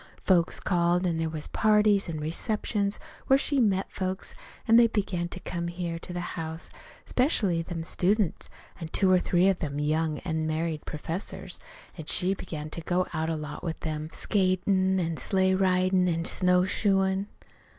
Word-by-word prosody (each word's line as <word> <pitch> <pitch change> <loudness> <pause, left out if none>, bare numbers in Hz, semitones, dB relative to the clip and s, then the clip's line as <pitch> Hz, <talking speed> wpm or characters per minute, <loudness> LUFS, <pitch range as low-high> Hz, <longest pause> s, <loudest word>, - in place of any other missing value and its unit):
Folks 175 -3 +2
called, 175 0 +1
an' 165 -2 0
there 165 0 -1
was 155 -1 -4
parties 210 -3 +3
an' 160 -2 -4
receptions 200 +5 -1 0.3
where 270 - +6
she 280 0 +1
met 195 -4 +1
folks, 185 0 -3 0.3
an' 225 - +6
they 235 0 +7
began 195 -6 -1
to 180 - -7
come 170 -1 -4
here 170 -1 -4
to 180 - -7
the 175 0 -4
house, 160 +1 -5 0.3
'specially 210 - +2
them 165 -1 -5
students, 190 +2 0 0.3
an' 165 - -5
two 185 +3 +2
or 185 - +5
three 180 +1 +2
of 195 -2 +2
them 145 -2 -3
young, 155 +1 0
unmarried 160 -1 -2
professors. 165 +5 -4 0.4
An' 160 - -6
she 180 +4 +2
began 155 -5 -6
to 165 - -5
go 180 +3 0
out 160 0 -1
a 165 - 0
lot 150 0 -6
with 165 -3 -4
them 155 -1 -4
skatin' 190 -1 +1
an' 165 -2 -2
sleigh 190 +1 +2
ridin' 185 -1 +2
an' 165 -1 -1
snowshoein'. 190 +2 +2
180 Hz, 165 wpm, -27 LUFS, 165-190 Hz, 0.4 s, they